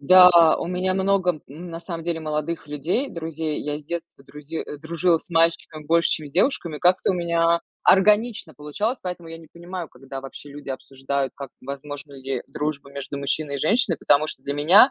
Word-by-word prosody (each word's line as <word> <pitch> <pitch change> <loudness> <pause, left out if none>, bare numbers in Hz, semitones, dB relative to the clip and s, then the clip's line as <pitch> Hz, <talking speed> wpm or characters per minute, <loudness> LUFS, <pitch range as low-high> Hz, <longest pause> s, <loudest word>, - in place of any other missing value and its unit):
Да. 175 +1 +8
У - - -3
меня 185 +1 0
много, 190 -1 +2 0.2
м, 160 +6 -9
на 165 -1 -7
самом 170 -2 -6
деле, 165 -1 -2
молодых 155 +1 -3
людей, 165 - -1
друзей. 160 -2 -3
Я 150 0 -3
с 150 - -14
детства 170 -3 -6
друзи 150 +3 -7
э, 150 - -8
дружила 165 +2 +1
с 190 - -17
мальчиками 165 -2 +1
больше, 170 +1 +3
чем 155 -2 -3
с - - -16
девушками. 170 - +1
Как-то 180 +4 +3
у - - +1
меня 170 -1 +2 0.2
органично 210 -3 +3
получалось, 195 - -2
поэтому 180 -2 -6
я 165 0 -8
не 160 -2 -15
понимаю, 175 0 -7
когда 135 +1 -9
вообще 135 +2 -10
люди 145 0 -10
обсуждают, 135 0 -3
как, 140 -2 -8
возможна 140 +2 -7
ли 135 -1 -4
дружба 145 -2 -4
между 140 0 -5
мужчиной 140 +1 -1
и - - -4
женщиной, 200 - +2
потому 145 +2 +3
что - - -5
для 140 - -2
меня 180 - +7
160 Hz, 195 wpm, -24 LUFS, 145-175 Hz, 0.2 s, Да